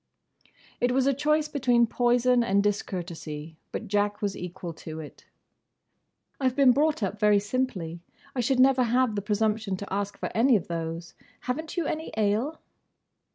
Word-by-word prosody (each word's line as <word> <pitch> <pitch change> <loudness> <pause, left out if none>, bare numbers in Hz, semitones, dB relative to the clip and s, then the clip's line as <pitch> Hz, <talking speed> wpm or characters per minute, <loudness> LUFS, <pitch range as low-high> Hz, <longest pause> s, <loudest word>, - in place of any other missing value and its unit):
It 245 0 +2
was 260 0 +2
a 275 - +3
choice 300 +3 +1
between 250 -5 +3
poison 245 +1 +3
and 200 -3 +2
discourtesy, 170 -6 -4
but - - -5
Jack 205 +1 0
was 200 -2 -2
equal 180 -1 -6
to 160 0 -8
it. 150 -2 -11 1.1
"I 260 -2 +3
've 250 - -11
been 275 -2 +6
brought 295 -2 +1
up 200 +2 -2
very 210 -1 +5
simply. 200 -6 -2 0.4
I - - -2
should 250 +2 +1
never 260 0 +5
have 245 0 +2
the 205 - -2
presumption 210 -1 0
to 200 0 -6
ask 200 0 -2
for - - -4
any 245 +2 +4
of 195 - -1
those. 165 0 -4 0.3
Have 250 +4 -2
n't 320 - -10
you 340 - 0
any 315 +2 -3
ale?" 220 +9 0
220 Hz, 170 wpm, -27 LUFS, 195-255 Hz, 1.1 s, been